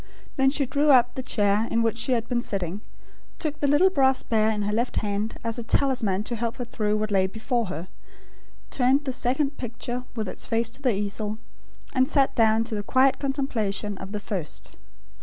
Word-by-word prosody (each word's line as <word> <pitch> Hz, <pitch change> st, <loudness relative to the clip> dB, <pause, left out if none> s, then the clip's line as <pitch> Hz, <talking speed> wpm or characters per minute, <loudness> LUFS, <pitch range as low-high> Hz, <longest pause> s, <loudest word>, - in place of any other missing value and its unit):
Then 270 Hz, 0 st, +4 dB
she 280 Hz, 0 st, +1 dB
drew 290 Hz, +4 st, +1 dB
up 245 Hz, -3 st, +6 dB
the 260 Hz, -, -4 dB
chair 210 Hz, -3 st, +1 dB
in 230 Hz, 0 st, +1 dB
which 225 Hz, 0 st, 0 dB
she 255 Hz, -, +1 dB
had 235 Hz, -1 st, 0 dB
been 245 Hz, -1 st, 0 dB
sitting; 195 Hz, -3 st, -3 dB, 0.6 s
took 300 Hz, -2 st, -3 dB
the 285 Hz, -, +1 dB
little 310 Hz, +7 st, +5 dB
brass 265 Hz, -5 st, +3 dB
bear 220 Hz, -1 st, +2 dB
in 210 Hz, -1 st, -1 dB
her 205 Hz, +1 st, -1 dB
left 235 Hz, +3 st, 0 dB
hand, 210 Hz, +1 st, -2 dB
as 230 Hz, +1 st, -2 dB
a -, -, -4 dB
talisman 225 Hz, -6 st, +1 dB
to 235 Hz, -, -3 dB
help 230 Hz, 0 st, -2 dB
her 245 Hz, -, -4 dB
through 215 Hz, -3 st, -1 dB
what 215 Hz, 0 st, -2 dB
lay 190 Hz, -1 st, +3 dB
before 225 Hz, +3 st, -1 dB
her; 180 Hz, -1 st, -5 dB, 0.8 s
turned 270 Hz, +3 st, +2 dB
the 265 Hz, -, -1 dB
second 270 Hz, +4 st, 0 dB
picture 245 Hz, +1 st, -4 dB
with 220 Hz, -3 st, -2 dB
its -, -, -6 dB
face 230 Hz, 0 st, 0 dB
to 255 Hz, -, -11 dB
the 250 Hz, -6 st, +2 dB
easel; 205 Hz, +1 st, -3 dB, 0.6 s
and 260 Hz, 0 st, +2 dB
sat 275 Hz, -3 st, +3 dB
down 225 Hz, -1 st, +3 dB
to 230 Hz, 0 st, -5 dB
the 210 Hz, -, -1 dB
quiet 260 Hz, +5 st, +3 dB
contemplation 225 Hz, -8 st, -1 dB
of 190 Hz, +1 st, -7 dB
the 210 Hz, -, -3 dB
first. 190 Hz, -6 st, -5 dB
230 Hz, 205 wpm, -25 LUFS, 210-265 Hz, 0.8 s, up